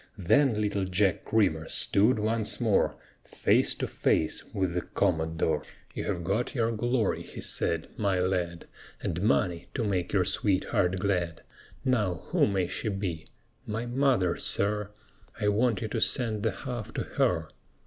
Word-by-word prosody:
Then 120 +5 +3
little 100 -2 0
Jack 95 +1 +1
Creamer 90 -8 +1
stood 110 +5 +3
once 110 0 -1
more - - +2 0.3
Face - - +2
to - - -2
face 80 - 0
with 95 -3 -1
the 90 - 0
Commodore. 80 -2 0 0.3
"You - - -4
have 90 -4 -2
got 105 - -1
your 115 -2 +1
glory," 120 0 0
he - - -10
said, 85 -1 0
"my 100 -3 +1
lad, 90 -2 -1 0.4
And 85 +2 -2
money 90 -5 +1
to 120 - 0
make 95 -4 -1
your 95 -3 +2
sweetheart 95 -1 +1
glad. 90 -4 -1 0.4
Now, 105 -10 +1
who - - +3
may 95 -3 +1
she 110 +5 -3
be?" 95 -5 -4 0.4
"My 110 +2 -3
mother, 120 -7 +2
sir; 105 +1 +1 0.5
I 105 - +2
want 110 0 +1
you - - -1
to 115 0 -2
send 115 -5 0
the - - +1
half 120 -4 -4
to - - -1
her." - - 0
100 Hz, 155 wpm, -28 LUFS, 90-110 Hz, 0.5 s, Then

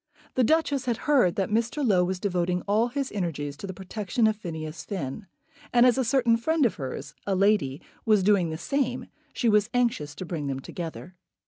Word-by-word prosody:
The 255 - +2
Duchess 285 -1 +2
had 240 -3 0
heard 250 - +4
that 195 -1 -1
Mr. 235 +5 0
Low 185 -4 +4
was 185 +1 -2
devoting 180 -2 0
all 215 +4 +2
his 275 +2 -3
energies 150 -7 -3
to 175 - -7
the 190 - -5
protection 210 +4 -1
of 220 -1 +3
Phineas 160 -5 -6
Finn; 190 0 -5 0.4
and, 240 0 +6
as 250 -2 +5
a - - +3
certain 240 -2 +3
friend 315 +5 +2
of 230 - +2
hers, 135 0 -6
a 195 - +1
lady, 195 -9 +2 0.2
was 215 -3 +3
doing 190 -4 +3
the 160 - -4
same, 255 - -1 0.3
she 240 - -1
was 210 0 +4
anxious 225 -12 0
to 185 - -6
bring 160 -4 -4
them 135 -1 -2
together. 170 +5 -7
205 Hz, 200 wpm, -26 LUFS, 175-240 Hz, 0.4 s, and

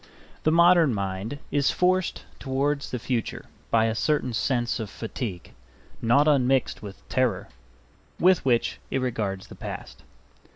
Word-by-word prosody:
The 155 - +2
modern 170 -5 +5
mind 100 +6 -3
is 145 -1 +2
forced 185 0 +1
towards 140 +2 -1
the 125 - -3
future 120 -1 -3 0.2
by 110 -1 +3
a 110 - +1
certain 130 +1 0
sense 120 +1 0
of 110 -3 -4
fatigue, 105 -4 -6 0.5
not 120 +6 +4
unmixed 135 -3 +2
with 100 -2 -10
terror, 125 -8 0 0.7
with 185 0 +4
which 120 -3 +1
it - - -1
regards 110 -7 -2
the - - -12
past. - - -8
125 Hz, 135 wpm, -26 LUFS, 110-145 Hz, 0.7 s, modern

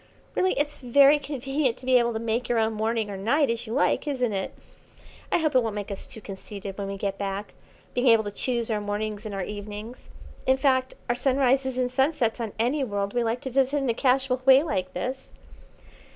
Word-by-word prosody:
Really, 375 0 +2
it's 290 0 -2
very 280 +3 +5
convenient 270 -2 -1
to 255 - -12
be 255 -1 +5
able 235 0 +1
to - - -2
make 230 +1 -2
your 240 - +2
own 220 0 +2
morning 220 0 -1
or 195 - -5
night 260 +7 +2
as 230 0 -4
you 220 - -4
like, 285 +3 +1
isn't 250 -6 0
it? 190 -1 -2 0.8
I - - +4
hope 310 -3 0
it 255 - +5
won't 225 -3 -3
make 205 0 -4
us 195 - -6
too 220 - -10
conceited 195 0 -8
when 200 -1 -4
we 195 0 -4
get 195 0 -3
back, 200 +1 -4 0.4
being 250 +1 +1
able 225 -2 +6
to 205 - -4
choose 235 +1 -1
our 210 -1 0
mornings 210 +1 -3
and 205 - -5
our 195 - -2
evenings; 210 +3 -8 0.4
in 260 0 +4
fact, 260 -1 +1
our 240 - +2
sunrises 265 0 +1
and 250 -1 0
sunsets 265 -3 +1
on 220 -3 -4
any 255 +6 +1
world 200 -4 -2
we 240 -1 +1
like 230 +2 -1
to 265 - -5
visit 270 +2 +2
in 270 -3 0
a - - -1
casual 260 +1 +1
way 265 +2 +7
like 185 - -2
this." 260 +8 -4
240 Hz, 220 wpm, -26 LUFS, 210-265 Hz, 0.8 s, way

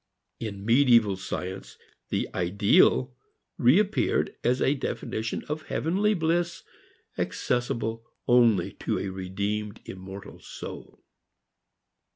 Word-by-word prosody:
In 100 -3 -5
medieval 115 -4 +5
science, 95 0 -6 0.3
the - - -1
ideal 100 +7 +3 0.4
reappeared 195 - +3
as 125 +2 +2
a 135 - +3
definition 115 -5 -3
of 155 +1 -4
heavenly 200 +6 +1
bliss 170 0 0 0.6
accessible 115 -2 -1 0.2
only 115 -7 +4
to - - -1
a 100 - -3
redeemed 100 +3 -3
immortal 95 +1 -9
soul. - - -9
115 Hz, 95 wpm, -27 LUFS, 100-140 Hz, 0.6 s, medieval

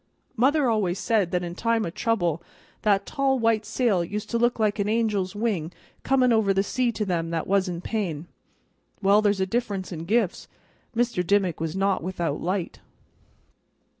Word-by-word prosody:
Mother 270 +4 +3
always 205 -6 +1
said 205 -3 +1
that 180 0 -1
in 175 -1 -4
time 230 +3 0
o' 170 - -4
trouble 175 -6 0 0.4
that 200 -2 +2
tall 275 -2 +1
white 225 -3 +1
sail 220 -5 +1
used 205 +5 -5
to 235 - +1
look 240 +1 +2
like 215 -1 +1
an 200 +1 0
angel's 210 -4 0
wing 205 -7 -1 0.3
comin' 255 -3 +3
over 205 -3 +2
the 195 - +3
sea 245 +3 0
to 210 - -2
them 170 -3 -1
that 165 -1 -2
was 195 -1 +1
in 170 -1 -4
pain. 180 -8 -3 0.8
Well, 200 +2 +5
there's 205 -2 +2
a 190 - +2
difference 200 -3 -2
in 165 -1 -6
gifts. 210 -1 0 0.5
Mr. 235 -6 +1
Dimmick 190 -2 +1
was 160 +1 -3
not 195 0 +1
without 170 -4 -3
light." 180 0 -2
200 Hz, 175 wpm, -25 LUFS, 180-230 Hz, 0.8 s, Well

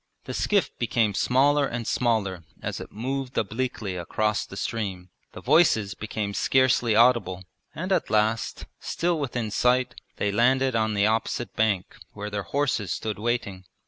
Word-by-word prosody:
The - - -6
skiff 205 -2 +1
became 115 -3 +1
smaller 140 +6 +3
and 120 -2 -4
smaller 110 -6 0 0.2
as - - -4
it - - -9
moved 130 +3 -4
obliquely 110 -3 -2
across 105 +5 -1
the - - -9
stream, 95 -6 -4 0.2
the - - -9
voices 110 - +3
became 105 -1 -4
scarcely 130 -2 +3
audible, 115 -6 +3 0.3
and 185 +5 -4
at - - +1
last, 110 +1 0
still 170 -1 -1
within 120 -6 -3
sight, 125 +4 +2 0.2
they 100 - 0
landed 130 +4 +3
on 110 -1 +1
the 100 0 +3
opposite 115 +2 -1
bank 105 -4 0 0.2
where 105 0 -6
their 100 0 -2
horses 110 -1 -1
stood 110 -2 -3
waiting. 105 -5 -2
110 Hz, 150 wpm, -26 LUFS, 105-130 Hz, 0.3 s, smaller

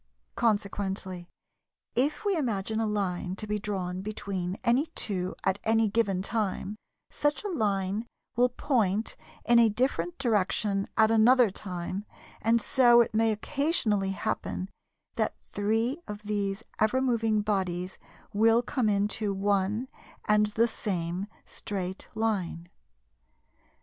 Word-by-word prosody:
Consequently, 195 -4 -1 0.7
if 290 - +1
we 400 -2 +2
imagine 220 - -1
a 225 - +1
line 185 -3 -2
to 215 - -5
be 210 0 -1
drawn 185 -3 -3
between 195 -3 -4
any 255 +7 +3
two 185 -3 -1
at 190 +1 +1
any 225 0 +3
given 195 -4 +1
time, 205 -1 -1 0.4
such 295 +5 0
a - - -2
line 205 - -1 0.3
will 245 +1 +4
point 225 -5 0 0.3
in 235 0 +6
a 230 -1 +6
different 205 -7 -1
direction 205 -4 +1
at 220 0 +5
another 230 0 +5
time, 185 0 -5 0.4
and 230 +2 +3
so 240 -3 +6
it 235 - 0
may 225 +1 +3
occasionally 215 - 0
happen 195 -1 -3 0.5
that - - 0
three 225 +8 0
of 210 -1 -7
these 205 0 -2 0.2
ever 220 +4 +3
moving 225 -4 +2
bodies 185 -3 -2 0.3
will 225 +3 +4
come 245 -3 0
into 205 +1 0
one 200 +4 0 0.4
and 210 0 +4
the 220 +3 +2
same 180 -3 -3 0.2
straight 190 -2 -5
line. 195 -6 -1
210 Hz, 125 wpm, -28 LUFS, 195-230 Hz, 0.7 s, in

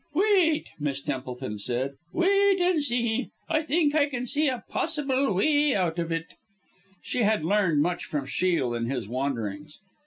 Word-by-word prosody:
"Wait," 370 -5 +3
Miss 140 -2 -2
Templeton 130 -5 -5
said, 125 +5 -2 0.2
"wait 395 - +3
and 355 -3 +2
see. 240 -2 0 0.2
I 315 -1 +1
think 310 -1 +1
I 295 -2 +3
can 250 -3 -3
see 295 +4 +1
a 255 -3 -2
possible 280 -5 0
way 290 +7 +3
out 175 -3 0
of 170 0 -2
it." 165 0 -1 0.8
She 250 - -2
had 215 -7 +2
learned 175 -6 +2
much 175 +2 -2
from 145 -3 -3
Shiel 140 -3 0
in 115 0 -2
his 125 -4 -3
"wanderings." 130 +2 -4
205 Hz, 160 wpm, -26 LUFS, -, 0.8 s, Wait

